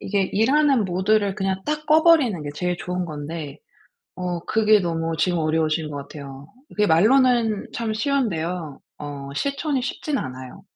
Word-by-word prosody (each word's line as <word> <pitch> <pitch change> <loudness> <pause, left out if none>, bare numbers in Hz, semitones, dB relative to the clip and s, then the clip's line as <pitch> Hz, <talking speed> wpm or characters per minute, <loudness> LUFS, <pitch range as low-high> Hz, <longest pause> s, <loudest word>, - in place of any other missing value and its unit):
이게 200 0 0
일하는 265 +2 +3
모드를 190 +2 +1
그냥 190 -1 -2
딱 305 0 -2
꺼버리는 310 - +4
게 145 - -5
제일 180 +3 -1
좋은 180 0 -3
건데 150 -1 -6 0.6
어 180 -1 -3
그게 215 -1 +3
너무 165 -2 -2
지금 175 +3 +1
어려우신 155 0 0
것 145 - -6
같아요. 140 0 -9 0.2
그게 210 0 0
말로는 225 +4 +3
참 230 -2 -2
쉬운데요 180 - -2 0.2
어 140 -1 -7
실천이 280 - -1
쉽진 275 +3 -3
않아요. 130 - -7
185 Hz, 310 characters per minute, -23 LUFS, 160-230 Hz, 0.6 s, 꺼버리는